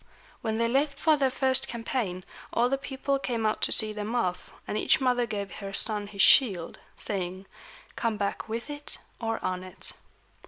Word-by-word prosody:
When 220 Hz, 0 st, -1 dB
they 230 Hz, 0 st, +2 dB
left 275 Hz, +3 st, +1 dB
for 315 Hz, 0 st, +5 dB
their 275 Hz, -2 st, +2 dB
first 265 Hz, +1 st, +1 dB
campaign, 230 Hz, -6 st, -3 dB, 0.3 s
all 240 Hz, +1 st, +2 dB
the 275 Hz, -, +1 dB
people 275 Hz, 0 st, -1 dB
came 235 Hz, -4 st, -2 dB
out 215 Hz, -, +1 dB
to -, -, +3 dB
see 215 Hz, -1 st, +2 dB
them 210 Hz, +3 st, -3 dB
off, 180 Hz, -7 st, -1 dB, 0.2 s
and -, -, -2 dB
each -, -, +3 dB
mother 245 Hz, -2 st, +2 dB
gave 200 Hz, -3 st, -4 dB
her 195 Hz, -1 st, -6 dB
son 210 Hz, 0 st, +1 dB
his 200 Hz, -1 st, +1 dB
shield, 195 Hz, -11 st, +5 dB, 0.2 s
saying, 185 Hz, -1 st, -2 dB, 0.5 s
"Come 230 Hz, -3 st, 0 dB
back 200 Hz, +2 st, -2 dB
with 230 Hz, +3 st, -3 dB
it 290 Hz, 0 st, -2 dB, 0.2 s
or 225 Hz, -1 st, -1 dB
on 185 Hz, 0 st, -1 dB
it." 185 Hz, 0 st, -2 dB
225 Hz, 185 wpm, -28 LUFS, 200-260 Hz, 0.5 s, for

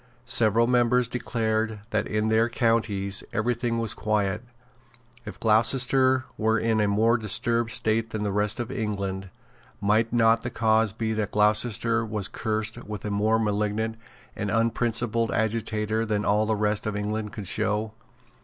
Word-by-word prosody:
Several 115 Hz, -1 st, +3 dB
members 125 Hz, 0 st, +2 dB
declared 110 Hz, -3 st, -2 dB
that -, -, 0 dB
in 110 Hz, 0 st, -1 dB
their 110 Hz, +1 st, +3 dB
counties 110 Hz, -5 st, +1 dB
every 115 Hz, +3 st, 0 dB
thing 120 Hz, 0 st, -2 dB
was 115 Hz, -2 st, +1 dB
quiet. 105 Hz, -1 st, -1 dB, 0.8 s
If 105 Hz, -, -9 dB
Gloucestershire 130 Hz, +4 st, +3 dB
were 110 Hz, +1 st, +2 dB
in 110 Hz, 0 st, +1 dB
a 105 Hz, -, +2 dB
more 110 Hz, +4 st, +2 dB
disturbed 115 Hz, +2 st, 0 dB
state 110 Hz, 0 st, 0 dB
than 110 Hz, -2 st, -4 dB
the 100 Hz, -, -1 dB
rest 105 Hz, +2 st, 0 dB
of 120 Hz, +1 st, -4 dB
England, 100 Hz, -5 st, -3 dB, 0.5 s
might 110 Hz, +3 st, +1 dB
not 115 Hz, -1 st, +3 dB
the 120 Hz, -, -4 dB
cause 110 Hz, -2 st, +2 dB
be 110 Hz, +1 st, -3 dB
that 110 Hz, -1 st, -2 dB
Gloucestershire 110 Hz, +2 st, +2 dB
was 105 Hz, -3 st, -3 dB
cursed 110 Hz, 0 st, -3 dB
with 105 Hz, -2 st, -7 dB
a 105 Hz, -, -3 dB
more 105 Hz, +2 st, +2 dB
malignant 105 Hz, +1 st, -1 dB, 0.4 s
and 105 Hz, -, -3 dB
unprincipled 115 Hz, 0 st, +1 dB
agitator 110 Hz, 0 st, -1 dB
than 105 Hz, -2 st, -1 dB
all 105 Hz, +1 st, +2 dB
the 110 Hz, -, +1 dB
rest 105 Hz, 0 st, 0 dB
of 105 Hz, -, -2 dB
England 105 Hz, +1 st, -3 dB
could 105 Hz, -1 st, -7 dB
show? 105 Hz, +4 st, -1 dB
110 Hz, 155 wpm, -25 LUFS, 105-115 Hz, 0.8 s, Several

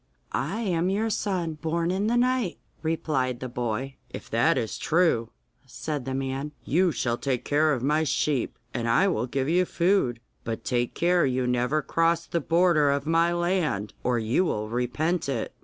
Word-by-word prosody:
'I 195 Hz, +11 st, -2 dB
am 180 Hz, -4 st, 0 dB
your 215 Hz, +3 st, 0 dB
son, 180 Hz, -7 st, -2 dB
born 170 Hz, +1 st, 0 dB
in 195 Hz, +3 st, 0 dB
the 240 Hz, +2 st, +2 dB
night,' 250 Hz, -5 st, +1 dB, 0.2 s
replied 150 Hz, -6 st, -1 dB
the 130 Hz, -, -4 dB
boy. 125 Hz, +2 st, -3 dB
'If -, -, -9 dB
that -, -, +3 dB
is 110 Hz, -, -2 dB
true,' 160 Hz, -9 st, +2 dB, 0.4 s
said 145 Hz, +1 st, -4 dB
the 130 Hz, 0 st, -3 dB
man, 135 Hz, +2 st, -3 dB
'you 175 Hz, +4 st, +3 dB
shall 120 Hz, -5 st, -1 dB
take 130 Hz, -3 st, -2 dB
care 150 Hz, +2 st, +3 dB
of 130 Hz, -4 st, -1 dB
my 150 Hz, +3 st, +2 dB
sheep, 145 Hz, -3 st, 0 dB, 0.2 s
and 115 Hz, 0 st, -1 dB
I 190 Hz, +12 st, +4 dB
will 125 Hz, -, 0 dB
give 135 Hz, +1 st, -1 dB
you 175 Hz, +3 st, +3 dB
food. 170 Hz, -10 st, +1 dB, 0.2 s
But 115 Hz, -1 st, -5 dB
take 120 Hz, -1 st, 0 dB
care 175 Hz, 0 st, +3 dB
you 130 Hz, 0 st, 0 dB
never 125 Hz, +5 st, +1 dB
cross 165 Hz, +2 st, +1 dB
the 170 Hz, -, -1 dB
border 165 Hz, -2 st, +3 dB
of 140 Hz, 0 st, 0 dB
my 165 Hz, +2 st, +3 dB
land, 175 Hz, -, 0 dB
or 125 Hz, -1 st, +1 dB
you 115 Hz, +9 st, +1 dB
will 105 Hz, -, -2 dB
repent 140 Hz, +8 st, -1 dB
it. 120 Hz, -5 st, -2 dB
150 Hz, 180 wpm, -26 LUFS, 125-175 Hz, 0.4 s, I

